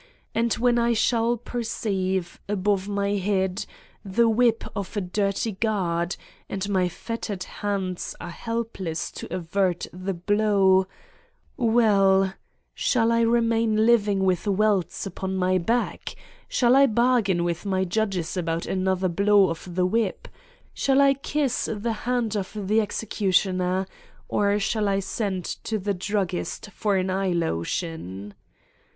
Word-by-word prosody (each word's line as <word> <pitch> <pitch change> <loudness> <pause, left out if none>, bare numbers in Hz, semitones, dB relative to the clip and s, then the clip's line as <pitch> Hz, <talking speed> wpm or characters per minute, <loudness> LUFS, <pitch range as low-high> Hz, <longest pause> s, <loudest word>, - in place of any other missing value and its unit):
And 230 0 +1
when 240 +1 +2
I 235 0 +2
shall 235 +1 +2
perceive, 195 -6 -2
above 200 -1 0
my 200 0 0
head, 190 -1 -1 0.4
the 220 +4 +2
whip 230 0 +3
of 200 +1 -4
a - - +1
dirty 195 +4 -1
guard 185 -4 -1 0.3
and 195 0 -3
my 185 -3 +2
fet 230 +6 -6
tered 190 -3 -3
hands 195 -3 -3
are 175 - -7
helpless 225 -6 -4
to - - -8
avert 180 0 0
the 185 +1 -4
blow... 195 0 +3 0.7
well: 200 -6 +3 0.4
shall 230 -2 +2
I 230 0 +3
remain 230 -1 +2
living 210 -4 +3
with 185 +2 +1
welts 200 -2 +1
upon 190 0 -4
my 185 0 +2
back? 235 +7 -1 0.3
Shall 245 0 +3
I 275 0 +7
bargain 225 -6 +2
with 175 -1 -2
my 190 -2 0
judges 190 -3 -1
about 165 -2 -2
an 190 0 -1
other 190 0 +1
blow 200 +1 +4
of 170 +1 -7
the 180 0 +2
whip? 215 +1 -1 0.5
Shall 270 0 +2
I 275 -1 +6
kiss 275 -1 -1
the 225 +2 -2 0.2
hand 240 -4 0
of 195 -2 -3
the 210 +3 +2
executioner? 190 -3 0 0.4
Or 205 0 +2
shall 210 +1 0
I 195 0 +1
send 195 -2 -3
to 220 - -3
the 200 0 -1
druggist 195 +1 -3
for 205 -2 0
an 185 0 0
eye 190 -1 0
lotion? 105 - -3
200 Hz, 140 wpm, -25 LUFS, 185-225 Hz, 0.7 s, I